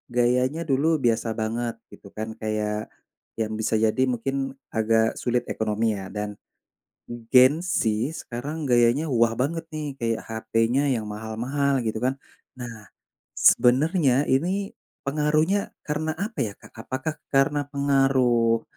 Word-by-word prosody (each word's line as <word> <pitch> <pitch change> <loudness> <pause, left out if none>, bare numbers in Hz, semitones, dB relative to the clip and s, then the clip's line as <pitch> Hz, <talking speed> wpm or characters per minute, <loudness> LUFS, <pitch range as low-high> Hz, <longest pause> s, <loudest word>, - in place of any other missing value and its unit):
gayanya 125 +5 +2
dulu 140 +4 +2 0.2
biasa 115 0 +2
banget 115 +2 -2 0.2
gitu 100 - -13
kan. 110 +1 -4
Kayak 105 0 -2 0.5
yang 110 -1 -1
bisa 110 0 0
jadi 110 +4 +2
mungkin 135 +4 -2 0.4
agak 110 0 +1
sulit 120 0 0
ekonomi 110 +1 -1
ya, 95 - -7
dan 105 0 -2 1.0
gen 130 +3 +7
z 180 +1 -1 0.4
sekarang 145 +6 -5
gayanya 120 +5 +4
wah 115 -1 +3
banget 165 +5 -1
nih 155 -1 -3 0.2
kayak 115 -1 0
hp-nya 115 +4 0
yang 110 - -4
mahal-mahal 120 +6 -1
gitu 110 0 -1
kan. 130 +2 +1 0.4
Nah, 115 -4 -8 0.5
sebenarnya 135 +2 +4
ini 185 +8 0 0.3
pengaruhnya 155 +6 +2 0.3
karena 155 +1 -1
apa 220 -7 -8
ya, 100 - -6
Kak? - - -15
Apakah 130 +5 -3 0.2
karena 145 +2 +3
pengaruh, 130 -5 +3
125 Hz, 130 wpm, -25 LUFS, 115-145 Hz, 1.0 s, gen